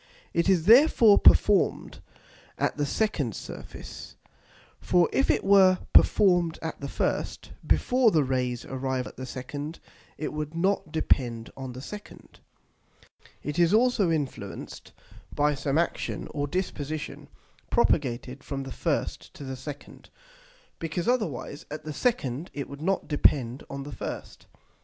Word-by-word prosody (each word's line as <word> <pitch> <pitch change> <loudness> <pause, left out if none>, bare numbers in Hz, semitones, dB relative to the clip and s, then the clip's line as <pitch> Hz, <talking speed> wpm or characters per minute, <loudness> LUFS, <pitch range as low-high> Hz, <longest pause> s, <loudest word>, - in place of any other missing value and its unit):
It 170 +3 +2
is 175 -4 +3
therefore 230 - +7
perform'd 205 -2 +4 0.6
at - - 0
the 145 -1 -1
second 145 - -1
Surface; - - -9 0.6
for 175 -2 +3
if 270 - +2
it - - +2
were 190 -2 +6 0.2
perform'd 175 -5 +4
at 160 - -5
the 140 - -4
first, - - -2 0.2
before 250 -2 +3
the 160 -7 +3
Rays 125 -2 -1
arrive 130 -1 -2
at - - -10
the 130 0 -7
second, 145 +5 -6 0.4
it 155 - -4
would 150 +1 -4
not 185 -2 0
depend 120 -7 0
on 130 -2 -7
the 130 +2 -9
second. 210 +5 -11 1.0
It 150 +3 -3
is 170 +4 +5
also 230 -5 +3
influenced 140 -11 -4 0.4
by 150 0 +2
some 140 +1 -1
action 170 - -1
or 145 -1 -2
disposition, 155 -3 -4 0.4
propagated 130 0 0
from 135 -1 -4
the 135 - -8
first - - -2
to - - -9
the 130 -1 -5
second, 140 +2 -10 0.7
because 165 +3 -3
otherwise 210 - -2
at 155 +1 -7
the 155 - -4
second 160 - -1
it 140 - -4
would 140 +1 -10
not 190 +3 0
depend 135 -4 +2
on 140 0 -5
the 145 - -8
first. - - -7
150 Hz, 140 wpm, -27 LUFS, 135-185 Hz, 1.0 s, therefore